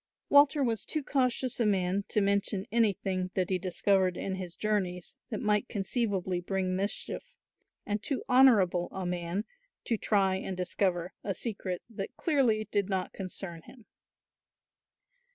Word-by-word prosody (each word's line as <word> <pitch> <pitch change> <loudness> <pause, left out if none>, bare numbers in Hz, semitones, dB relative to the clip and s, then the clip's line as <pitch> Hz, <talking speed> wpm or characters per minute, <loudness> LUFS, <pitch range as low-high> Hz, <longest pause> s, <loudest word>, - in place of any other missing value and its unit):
Walter 285 0 +6
was 230 -4 0
too 310 -2 -3
cautious 255 -2 +1
a 235 - +3
man 195 0 +1
to 210 - +1
mention 200 0 +1
anything 195 -5 +1
that 185 0 0
he 185 - +1
discovered 185 0 +1
in 195 - -3
his 185 -2 -5
journeys 190 -5 -2
that 215 - -4
might 210 +2 +2
conceivably 195 -4 -1
bring 185 0 -1
mischief, 210 - -3 0.5
and 205 0 -1
too 275 +4 -2
honourable 215 -9 +5
a 190 -1 -4
man 175 +3 -2 0.4
to 230 - 0
try 195 -3 +2
and 190 -1 -5
discover 180 -1 0
a 195 - -2
secret 195 -6 -3
that 200 -4 -7
clearly 240 - +2
did 205 -1 +1
not 190 -2 -2
concern 185 -3 -6
him. 240 -5 -15
195 Hz, 145 wpm, -30 LUFS, 185-225 Hz, 0.5 s, Walter